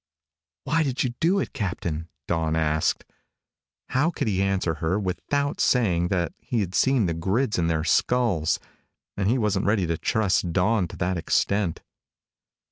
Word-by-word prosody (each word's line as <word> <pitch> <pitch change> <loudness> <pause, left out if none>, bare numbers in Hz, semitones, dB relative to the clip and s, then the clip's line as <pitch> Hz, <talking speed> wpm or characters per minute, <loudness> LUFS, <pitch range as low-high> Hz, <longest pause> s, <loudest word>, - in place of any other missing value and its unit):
"Why 160 +4 +1
did 135 -4 0
you 125 - -1
do 180 +5 +3
it, 195 - -2
Captain?" 85 - -3 0.2
Dawn 80 -2 0
asked. 80 -1 0 0.8
How 145 +6 +2
could 170 - -3
he 95 -3 +1
answer 95 -4 0
her, 90 +5 +1
without 125 +10 -2
saying 90 -9 +2 0.3
he 115 - -2
had 95 -2 -3
seen 130 0 +3
the 85 - 0
grids 100 +7 0
in 85 - +1
their 80 -1 0
skulls? 105 -5 +2 0.6
And 100 0 0
he 125 - +3
wasn't 105 -4 0
ready 105 -3 +2
to 85 -1 -2
trust 100 -5 +1
Dawn 95 +2 +2
to - - -10
that 90 +1 -1
extent. 95 +2 0
95 Hz, 155 wpm, -25 LUFS, 85-120 Hz, 0.8 s, do